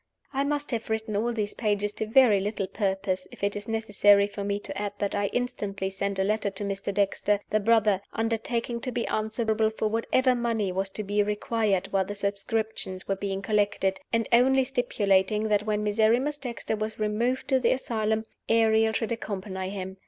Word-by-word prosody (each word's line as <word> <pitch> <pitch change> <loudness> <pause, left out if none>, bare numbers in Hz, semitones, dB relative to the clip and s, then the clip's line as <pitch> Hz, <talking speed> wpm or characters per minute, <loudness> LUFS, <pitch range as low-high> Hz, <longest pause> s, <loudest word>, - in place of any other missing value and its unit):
I 275 +1 +1
must 290 0 -2
have 230 -2 -3
written 220 -1 -2
all 230 +4 +1
these 210 -3 -2
pages 205 -2 0
to 215 +1 -4
very 225 -3 +5
little 200 0 -2
purpose 190 -1 -2
if - - -13
it 200 0 +1
is 205 - -5
necessary 205 -2 +4
for 200 0 -6
me 200 0 -1
to 195 - -7
add 205 0 -3
that 200 -1 -2
I 205 0 +1
instantly 200 -5 -2
sent 200 +1 -2
a 190 - +2
letter 210 +1 +1
to 195 +1 -5
Mr. 200 0 -3
Dexter, 200 +1 +1
the 215 - +3
brother, 215 -2 +3
undertaking 230 +1 -2
to 255 - -3
be 240 -1 -1
answerable 220 0 0
for 220 0 -2
whatever 255 +3 +2
money 230 -5 0
was 190 +1 -2
to 210 +2 -5
be 205 +1 +1
required 210 -2 0
while 190 -1 +2
the 205 - -5
subscriptions 200 -1 -3
were 195 - +1
being 195 0 -3
collected, 205 -2 +1
and 230 -1 +1
only 265 +2 +5
stipulating 215 -5 +1
that 210 0 +1
when 210 0 0
Miserrimus 225 +8 +2
Dexter 235 -4 -3
was 215 0 -4
removed 225 +4 0
to 265 -2 +4
the 245 - +2
asylum, 220 -3 -1 0.2
Ariel 220 -1 +4
should 225 0 -1
accompany 190 -4 -4
him. 190 -1 -6
210 Hz, 190 wpm, -27 LUFS, 200-225 Hz, 0.2 s, very